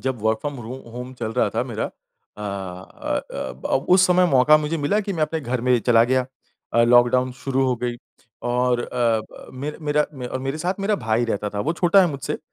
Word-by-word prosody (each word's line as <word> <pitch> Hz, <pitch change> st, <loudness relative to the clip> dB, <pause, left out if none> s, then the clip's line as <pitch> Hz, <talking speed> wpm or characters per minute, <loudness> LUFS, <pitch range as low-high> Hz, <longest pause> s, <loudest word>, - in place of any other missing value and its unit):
जब 130 Hz, -4 st, -2 dB
work 110 Hz, 0 st, +2 dB
from 145 Hz, -2 st, -4 dB
row 120 Hz, +3 st, -7 dB
home 120 Hz, -3 st, -13 dB
home 125 Hz, +1 st, -6 dB
चल 110 Hz, -2 st, -4 dB
रहा 125 Hz, -, +2 dB
था -, -, +1 dB
मेरा। -, -, -3 dB
अ 105 Hz, -, -13 dB
अ 95 Hz, -2 st, -4 dB
अ, -, -, -4 dB
ब 65 Hz, -, -7 dB, 0.2 s
उस 185 Hz, 0 st, +6 dB
समय 180 Hz, 0 st, +4 dB
मौका 135 Hz, +3 st, +6 dB
मुझे 155 Hz, +2 st, -2 dB
मिला 175 Hz, +9 st, +1 dB
कि 200 Hz, -1 st, -4 dB
मैं 160 Hz, -3 st, -1 dB
अपने 160 Hz, +1 st, -1 dB
घर 125 Hz, -2 st, -2 dB
में 125 Hz, 0 st, +3 dB
चला 115 Hz, 0 st, +4 dB
गया। 130 Hz, 0 st, +1 dB, 0.5 s
अ, 115 Hz, -, +4 dB
लॉकडाउन 120 Hz, +1 st, +4 dB
शुरू 135 Hz, +1 st, -1 dB
हो 125 Hz, -, +2 dB
गई 120 Hz, 0 st, -3 dB, 0.5 s
और 125 Hz, 0 st, +1 dB
अ, -, -, -4 dB, 0.3 s
ब -, -, -13 dB
मेर 150 Hz, +2 st, -5 dB
मेरा 150 Hz, 0 st, +1 dB
मैं 125 Hz, -2 st, -6 dB
और 130 Hz, -, -3 dB
मेरे 135 Hz, +3 st, -3 dB
साथ 180 Hz, +4 st, -1 dB
मेरा 210 Hz, +2 st, +1 dB
भाई 110 Hz, -2 st, 0 dB
रहता 105 Hz, -2 st, -2 dB
था, 100 Hz, 0 st, -3 dB
वो 155 Hz, +8 st, 0 dB
छोटा 175 Hz, +3 st, +4 dB
है 185 Hz, -, +5 dB
मुझसे। 140 Hz, -2 st, -4 dB
130 Hz, 230 wpm, -22 LUFS, 120-150 Hz, 0.5 s, उस